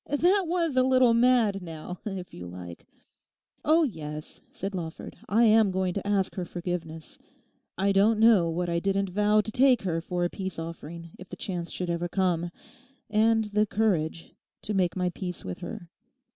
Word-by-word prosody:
That 360 +7 +3
was 335 -4 0
a 255 - +5
little 255 -2 +4
mad, 230 -4 +3
now, 165 +1 -8
if 190 -4 -5
you 90 0 -8
like!' 90 -1 -10 0.8
'Oh 320 +2 +4
yes,' 155 - -6
said 195 +2 -5
Lawford, 165 -3 -6
'I 225 +4 +4
am 220 -2 +5
going 185 -1 -1
to 200 +1 -4
ask 195 -2 +1
her 185 - -3
forgiveness. 170 -2 -6 0.6
I 195 +2 +2
don't 210 +3 +3
know 220 -7 +5
what 175 +2 -2
I 170 0 0
didn't 195 +1 0
vow 210 +2 +3
to 220 - -6
take 255 0 +4
her 165 -3 -1
for 175 +1 -2
a - - 0
peace 190 -2 -5
offering 165 0 -7
if 185 - -11
the - - -7
chance 175 -3 -4
should 180 -1 -3
ever 170 +1 -1
come—and 215 +6 -1
the 210 +1 +3
courage—to 190 -1 -2
make 185 -3 +1
my 180 -1 0
peace 180 0 -6
with 90 - -5
her. 175 -1 -8
190 Hz, 170 wpm, -27 LUFS, 170-220 Hz, 0.8 s, a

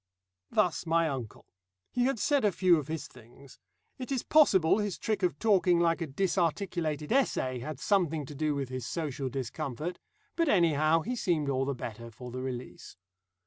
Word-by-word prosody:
Thus 175 0 +1
my 165 0 +3
uncle. 130 -7 -6 0.5
He 245 0 +1
had 270 -1 +1
said 285 +4 +2
a 210 - +4
few 175 0 +4
of 145 - -7
his 160 0 -4
things. 125 +4 -17 0.4
It 255 0 -6
is 260 -3 0
possible 195 - +4
his 205 -3 -2
trick 215 -2 -2
of 175 -6 0
talking 190 -5 +3
like 170 0 +2
a 165 - -2
disarticulated 170 -1 -1
essay 130 - +1
had 140 +3 -6
something 165 -5 +1
to 150 - -9
do 150 +1 -1
with 135 -2 -3
his 130 -2 -5
social 145 -5 -3
discomfort. 135 +5 -4 0.4
But 335 -3 +1
anyhow 165 - +3
he 245 +8 -3
seemed 165 - 0
all 135 -1 0
the 140 0 -2
better 115 -1 -7
for 125 +2 -10
the 130 +1 -5
release. 130 -1 -7
160 Hz, 180 wpm, -30 LUFS, 135-190 Hz, 0.5 s, a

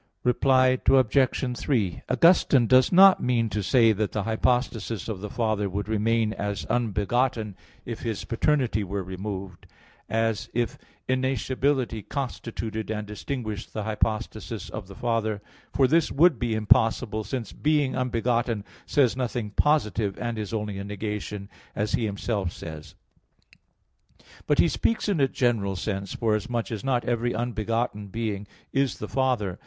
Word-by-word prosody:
Reply 130 0 +3
Obj. 130 0 +3
3: 110 -11 0
Augustine 140 -3 +5
does 130 +2 +5
not 190 +1 +7
mean 120 -2 +1
to 105 - -2
say 115 +3 +4
that 110 0 -1
the 105 - -1
hypostasis 115 -2 0
of 105 -4 -4
the 105 - -5
Father 110 -3 0
would 100 +3 -3
remain 110 0 +1
as 100 -1 -3
unbegotten, 115 0 0 0.3
if 115 -2 -5
His 115 -3 -4
paternity 120 -3 +1
were 100 0 -3
removed, 95 -1 -6 0.4
as 115 0 0
if 120 -3 -1 0.3
innascibility 130 -1 0
constituted 115 -4 -4
and 105 -1 -3
distinguished 110 0 -5
the 110 - -3
hypostasis 110 0 -2
of 105 -3 -6
the 95 - -11
Father; 115 -3 -1 0.3
for 135 - +3
this 165 +4 +2
would 155 -2 +4
be 120 -3 0
impossible, 110 -1 +2
since 115 +2 -5
"being 145 -3 +1
unbegotten" 120 -3 0 0.2
says 130 -6 +3
nothing 120 -4 -3
positive 110 - +1
and 120 -2 -3
is 105 -2 -4
only 105 -3 -3
a - - -4
negation, 105 0 -5 0.3
as 105 +1 -1
he 120 -4 +1
himself 100 -2 -2
says. 80 -3 -9 1.5
But 145 - +3
he - - +5
speaks 225 +7 0
in 200 -6 +1
a 135 - +4
general 115 -7 0
sense, 100 +1 -3
forasmuch 115 +1 -1
as 110 -3 -4
not 125 -3 0
every 120 0 0
unbegotten 115 -2 -2
being 105 -1 -3 0.3
is 135 -1 +1
the 105 - -5
Father. 120 -7 0
115 Hz, 145 wpm, -26 LUFS, 105-125 Hz, 1.5 s, not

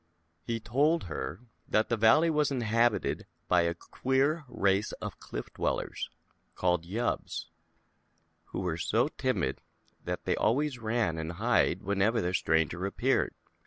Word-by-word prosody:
He 115 +6 -3
told 145 - +2
her 85 - -5 0.3
that 110 +1 +2
the 115 - +2
valley 115 +10 +5
was 150 -1 +2
inhab 120 -3 +2
ited - - -3 0.2
by 90 -1 +4
a 85 0 0
queer 135 - 0
race 100 -4 +1
of - - -6
Cliff - - -7
Dwellers, - - -2 0.5
called 90 -2 +1
Yubbs, 115 +6 -2 1.0
who - - -5
were 90 -3 -1
so 115 - +1
timid 130 - -1 0.4
that - - -3
they - - +2
always 130 +3 +1
ran 110 -7 0
and 80 +1 -4
hid - - +2
whenever 100 +1 +1
a 90 - -1
stranger 80 0 +1
appeared. 100 - +1
110 Hz, 140 wpm, -30 LUFS, 90-125 Hz, 1.0 s, valley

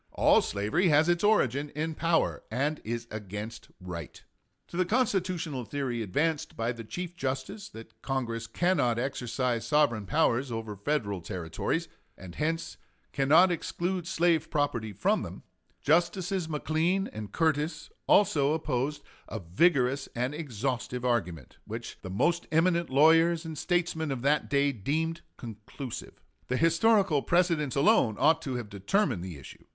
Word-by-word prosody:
All - - +5
slavery 105 - 0
has 150 +1 +4
its 175 +1 +2
origin 145 - +2
in 160 +1 -2
power 165 +1 +1
and 145 +6 -1
is 115 +1 -4
against 105 +1 -7
right. 90 -4 -8 0.5
To - - -9
the 185 - +3
constitutional 185 - 0
theory 120 0 -3
advanced 145 - -1
by 115 +1 0
the 115 -1 -7
Chief 175 +9 -6
Justice, 135 +8 -4
that 115 0 -13
Congress 115 -4 -3
cannot 125 -2 +1
exercise 125 -2 -2
sovereign 120 -8 +2
powers 135 -4 +1
over 115 -2 -4
Federal 100 -4 -2
Territories, 80 -2 -3 0.3
and 90 -2 -10
hence 160 - -2 0.4
cannot 155 +7 +5
exclude 175 +1 -2
slave 170 -3 +2
property 130 -8 -1
from 100 - +1
them, - - -8 0.4
Justices 175 +2 +1
McLean 160 +5 0
and 105 -2 -7
Curtis 155 +1 0 0.2
also 150 -8 +4
opposed 145 -2 -2 0.2
a 110 - -5
vigorous 130 - +2
and 125 +4 -1
exhaustive 125 -3 -3
argument, 90 - -2
which - - -7
the 95 - -7
most 170 - +1
eminent 170 +1 +2
lawyers 165 +4 +4
and 160 -1 -5
statesmen 170 -1 -1
of 130 -2 -4
that 150 +2 +2
day 140 0 +3
deemed 155 - -2 0.2
conclusive. 115 +3 -8 0.3
The 125 - 0
historical 170 - +3
precedents 170 -5 +1
alone 140 - +4
ought 160 +2 +4
to 135 -4 -4
have 120 -3 -4
determined 100 - 0
the 90 -5 -7
issue. 70 - -13
145 Hz, 140 wpm, -29 LUFS, 115-165 Hz, 0.5 s, All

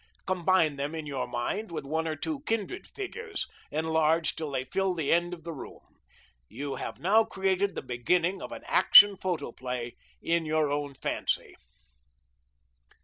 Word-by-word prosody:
Combine 180 -5 +2
them 145 +3 -3
in 160 -1 -5
your 140 -3 -3
mind 205 - -3
with 160 - -5
one 160 +3 -1
or 155 - -2
two 295 - -4
kindred 225 - -2
figures, 415 +1 -5 0.2
enlarged 160 +1 +1
till 155 -2 -4
they 130 -2 -2
fill 190 +5 0
the 160 -4 +1
end 175 +1 +2
of 170 -3 -8
the 170 0 -5
room. 140 - -12 0.5
You 140 0 -5
have - - -5
now 215 +6 +4
created 195 -2 0
the - - -4
beginning 170 +10 0
of - - -7
an - - -8
Action 205 -1 +8
Photoplay 125 -9 -4 0.3
in 170 0 +1
your 155 -2 +1
own 145 -1 -2
fancy. - - -2
165 Hz, 155 wpm, -28 LUFS, 145-190 Hz, 0.5 s, Action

